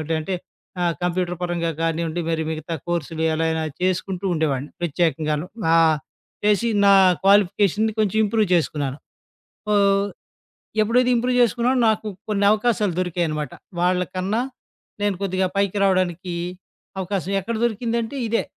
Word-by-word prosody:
ఏంటంటే 160 +3 -2 0.4
ఆ! - - +1 0.2
కంప్యూటర్ 180 0 -1
పరంగా 175 -2 -1
కానివ్వండి 165 +1 -1
మరి 165 -1 0
మిగతా 160 +1 -4
కోర్సులు 165 -2 -2
ఎలా 160 +1 0
అయినా 160 0 -1 0.2
చేసుకుంటూ 185 +1 -1
ఉండేవాడిని. 145 -3 -1
ప్రత్యేకంగాను. 160 -1 0 0.3
ఆహ్, 160 -1 +5 0.5
చేసి 210 +3 +3 0.2
నా 200 - +7 0.3
క్వాలిఫికేషన్‌ని 205 +2 +3
కొంచెం 215 -1 +1
ఇంప్రూవ్ 215 +1 +1
చేసుకున్నాను. 145 -4 -1 0.8
ఆహ్, 200 -1 +4 0.8
ఎప్పుడైతే 245 +3 +3
ఇంప్రూవ్ 250 +1 +1
చేసుకున్నానో 245 +2 +2
నాకు 220 0 +1 0.2
కొన్నవకాశాలు 210 -1 +2
దొరికాయనమాట. 165 -5 -1 0.3
వాళ్ళకన్నా 185 +4 0 0.6
నేను 205 -1 +1
కొద్దిగా 190 -1 0
పైకి 200 0 +1
రావడానికి 185 -2 +1 0.7
అవకాశం 190 0 -2
ఎక్కడ 230 +4 -3
దొరికిందంటే 235 +2 -2
ఇదే. 230 +1 +1
185 Hz, 115 wpm, -22 LUFS, 165-210 Hz, 0.8 s, నా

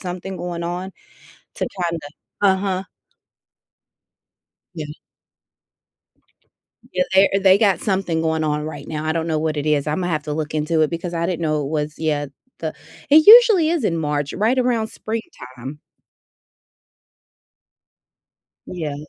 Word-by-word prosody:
something 185 +1 -6
going 175 -1 -5
on 180 +2 -4 0.7
to - - -1 0.2
kinda 170 -1 -3 0.4
Uh-huh. 190 -1 +1 1.9
Yeah. 155 -2 -5 2.1
Yeah, 180 0 +1
there 195 +1 +6
they 190 0 +6
got 195 -5 +3
something 190 -5 -1
going 160 -1 0
on 150 0 -1
right 145 -2 -7
now. 155 0 -4
I 155 - 0
don't 165 0 -2
know 160 -2 0
what 155 0 -1
it 145 - -2
is. 150 -1 +1
Imma 165 +4 -1
have 155 -3 -2
to 150 - -4
look 155 0 -4
into 155 +1 +1
it 155 - +1
because 170 +1 -4
I 170 0 -1
didn't 175 -1 -2
know 155 -2 0
it 140 - -4
was 150 -1 -2
yet 145 -3 -1 0.3
the - - -4 0.4
it 310 +2 +7
usually 435 -8 +8
is 335 -4 0
in 165 - +1
March, 150 -2 -2
right 230 +6 +1
around 240 -3 +1
springtime. 140 - -7 2.9
Yeah. 160 -5 -4
165 Hz, 140 wpm, -21 LUFS, 150-190 Hz, 2.9 s, usually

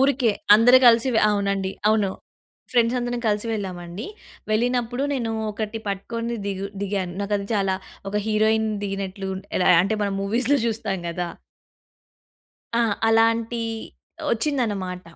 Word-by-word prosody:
ఊరికే. 265 -3 +3 0.2
అందరు 245 +4 +7
గలిసి 235 +2 +6
వె - - +4
అవునండి. 200 -2 0 0.2
అవును. 210 -3 +2 0.6
ఫ్రెండ్సందరం 245 0 +1
కలిసి 210 +1 +1
వెళ్ళామండి. 185 -1 -5 0.4
వెళ్ళినప్పుడు 245 +3 0
నేను 230 -4 -2 0.2
ఒకటి 215 +1 -4
పట్టుకొని 230 +4 -3
ది‌గు 195 0 -3 0.2
దిగాను. 190 -3 -2
నాకది 200 0 -1
చాలా 195 -2 +1 0.4
ఒక 210 - -2
హీరోయిన్ 220 0 +2 0.2
దిగినట్లు 195 -1 -4 0.3
ఎలా, 180 - +3
అంటే, 200 +4 0
మనం 200 -1 -1
మూవీస్‌లో 235 +7 +2
జూస్తాం 215 -4 -1
గదా! 175 +1 -3 1.5
ఆ! - - +4 0.3
అలాంటీ 230 +1 +2 0.7
ఒచ్చిందనమాట. 215 -9 -1
215 Hz, 115 wpm, -23 LUFS, 195-235 Hz, 1.5 s, అందరు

